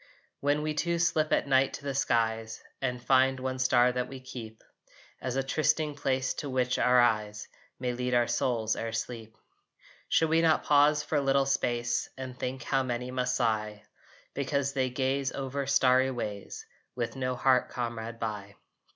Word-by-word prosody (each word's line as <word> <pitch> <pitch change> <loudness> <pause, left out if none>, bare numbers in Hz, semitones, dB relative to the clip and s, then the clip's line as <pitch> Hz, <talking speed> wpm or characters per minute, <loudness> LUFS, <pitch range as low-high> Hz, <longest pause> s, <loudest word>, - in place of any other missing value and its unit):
When 145 +1 +1
we 155 0 -1
two 170 +3 0
slip 165 -2 +1
at - - +2
night 135 0 +3
to - - -7
the 140 -1 -3
skies 115 -4 0 0.2
And 125 -2 -1
find 130 +1 +3
one 130 0 -3
star 125 -1 +4
that 125 0 -2
we 135 0 -8
keep 115 -4 -9 0.6
As 130 0 -3
a 135 - +1
trysting 155 +2 +1
place 130 -2 -1
to 145 - -4
which 130 -1 0
our 125 0 +5
eyes 105 -3 +1 0.3
May 125 -1 -1
lead 125 0 -1
our 120 0 +4
souls 120 -2 0
ere 115 0 -4
sleep, 110 -1 -5 0.7
Should 160 - +3
we 165 +1 +3
not 160 -1 +3
pause 150 0 +4
for 150 - -1
a - - +2
little 135 0 +2
space 120 -3 0
And 130 -1 -6
think 130 +1 -4
how 135 -1 +1
many 125 -1 -3
must 125 0 -1
sigh 110 -3 -1 0.5
Because 140 0 -1
they 130 -2 0
gaze 135 +2 -1
over 135 0 -3
starry 130 -1 +4
ways 105 -6 -5 0.3
With 120 0 -3
no 130 -1 -2
heart 130 0 +2
comrade 115 -1 -4
by? 105 -3 -5
130 Hz, 175 wpm, -29 LUFS, 120-135 Hz, 0.7 s, our